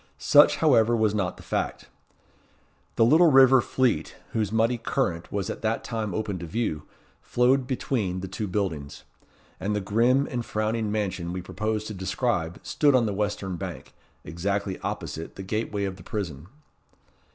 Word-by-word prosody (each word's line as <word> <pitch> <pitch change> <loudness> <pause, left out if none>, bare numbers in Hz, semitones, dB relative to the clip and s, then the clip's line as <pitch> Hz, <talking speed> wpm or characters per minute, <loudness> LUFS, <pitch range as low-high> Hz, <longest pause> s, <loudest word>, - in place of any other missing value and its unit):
Such, - - +6
however, 115 +1 +4
was 110 -2 +2
not 100 -4 -1
the - - -13
fact. - - -3 1.1
The 115 - +4
little 160 +7 +6
river 130 -1 +7
Fleet, 125 +2 0 0.2
whose 105 -3 -1
muddy 115 +2 +2
current 90 -10 -2
was 100 -2 -2
at - - -5
that 115 0 -1
time 110 -5 -3
open 105 -4 -2
to 85 - -6
view, 80 -6 -2 0.3
flowed 125 +1 +2
between 110 -8 -2
the 95 - -5
two 100 +3 -4
buildings; 85 -8 -3 0.6
and 105 +2 -1
the - - +1
grim 120 +8 +2
and 120 -2 -2
frowning 110 0 -1
mansion 95 -5 -2
we 90 - -4
propose 105 +4 -2
to 110 - -6
describe 95 -2 -2
stood 145 -3 +3
on 125 -2 +4
the 105 - -1
western 100 -2 -2
bank, - - -7 0.3
exactly 100 +3 -2
opposite 80 +1 -5
the 95 - -7
gateway 105 0 -2
of 95 -1 -3
the 90 - -13
prison. 85 -7 -5
105 Hz, 165 wpm, -26 LUFS, 95-115 Hz, 1.1 s, river